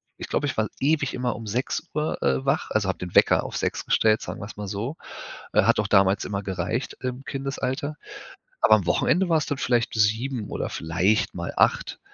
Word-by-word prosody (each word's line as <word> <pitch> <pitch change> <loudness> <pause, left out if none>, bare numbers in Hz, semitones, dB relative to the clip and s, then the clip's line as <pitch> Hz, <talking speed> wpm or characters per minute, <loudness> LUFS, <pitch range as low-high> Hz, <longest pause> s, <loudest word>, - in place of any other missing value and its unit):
ich - - -7
glaube, 145 - 0
ich 145 - -2
war 110 0 +1
ewig 145 0 +1
immer 125 -2 -1
6:00, 130 +7 -2
äh, 135 - +1
wach 140 +2 0
also, 110 -2 0
habe 95 - -2
den 90 -1 -7
Wecker - - +5
auf - - -5
6:00 - - -2
gestellt, 110 0 +3
sagen - - -6
wir - - -5
es 105 - -10
mal 105 -1 -5
so. 105 +9 -3 0.6
Äh, - - +5
hat - - +3
auch 105 - +1
damals 100 -1 +3
immer 100 0 -3
gereicht 95 +6 -3
im 130 +1 -4
Kindesalter. 135 +1 -3 0.6
Aber 110 - +6
am 100 -5 -1
Wochenende 175 - +2
war 165 - +4
es 150 - -1
dann 145 - -2
vielleicht 120 -4 +1
bis 110 - +3
7:00 110 +2 -1
oder - - -3
vielleicht 90 +7 +1
mal 85 -1 -5
8:00. - - +2
115 Hz, 210 wpm, -25 LUFS, 100-135 Hz, 0.6 s, Aber